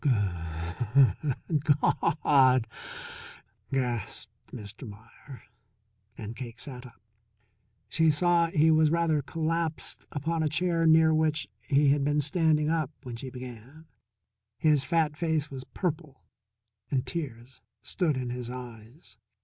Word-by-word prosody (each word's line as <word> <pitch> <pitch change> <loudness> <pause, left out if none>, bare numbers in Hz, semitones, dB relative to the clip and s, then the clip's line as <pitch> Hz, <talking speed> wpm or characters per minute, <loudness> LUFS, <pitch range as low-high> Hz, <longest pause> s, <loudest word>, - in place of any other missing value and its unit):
"Goo 150 - +2
hood 105 - 0
Gaw 150 +2 +2
hud!" 130 -4 +5 1.1
gasped 125 -5 -2 0.2
Mr. 110 +1 -9
Meier, 110 +6 -13 0.7
and 110 +1 -7
Cake 120 -1 -8
sat 130 -1 -8
up. 115 - -19 0.9
She 160 -1 +3
saw 170 +2 +3
he 160 -1 +3
was 155 -1 +4
rather 165 -2 +2
collapsed 165 +2 -3
upon 160 +3 -1
a 155 - +1
chair 165 +1 +1
near 160 0 +6
which 155 -2 +1
he 140 +5 +3
had 140 0 +3
been 145 +1 +2
standing 150 0 +2
up 160 -3 0
when 125 -3 -6
she 130 +3 -7
began. 125 +4 -10 0.7
His 150 -4 +3
fat 160 0 +1
face 155 -2 -1
was 130 -1 -7
purple, 155 -6 -4 0.7
and 130 -3 0
tears 130 -7 -6 0.2
stood 160 -7 0
in 125 -1 -3
his 125 -1 -5
eyes. 120 -1 -10
140 Hz, 125 wpm, -28 LUFS, 125-160 Hz, 1.1 s, near